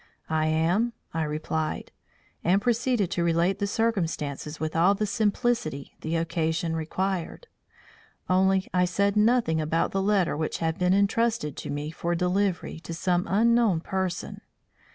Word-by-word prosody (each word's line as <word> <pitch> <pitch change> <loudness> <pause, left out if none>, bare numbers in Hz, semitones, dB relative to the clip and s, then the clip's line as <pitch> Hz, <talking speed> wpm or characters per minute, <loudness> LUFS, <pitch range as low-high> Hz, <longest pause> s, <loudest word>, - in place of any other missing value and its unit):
"I 155 0 +2
am," 175 +9 +1 0.2
I 165 - -1
replied; 155 +1 -3 0.5
and 185 +4 +3
proceeded 235 -3 +1
to 170 - 0
relate 170 +3 +1
the 200 - 0
circumstances 165 -9 -2
with 155 0 -3
all 180 +5 +4
the 210 - -1
simplicity 220 - -1
the 160 +1 -2
occasion 165 0 -1
required. 185 - -3 0.8
Only 190 +1 +3
I 180 0 +3
said 200 +3 +1
nothing 210 -7 +3
about 155 +2 0
the 195 - 0
letter 195 -5 +2
which 155 +1 -2
had 160 -1 -2
been 180 +1 +3
entrusted 210 - +1
to - - -6
me 145 +2 -3
for 170 +1 -2
delivery 180 -1 0
to 165 0 -7
some 180 +1 0
unknown 225 -3 +3
person. 190 -1 -3
180 Hz, 145 wpm, -26 LUFS, 160-200 Hz, 0.8 s, all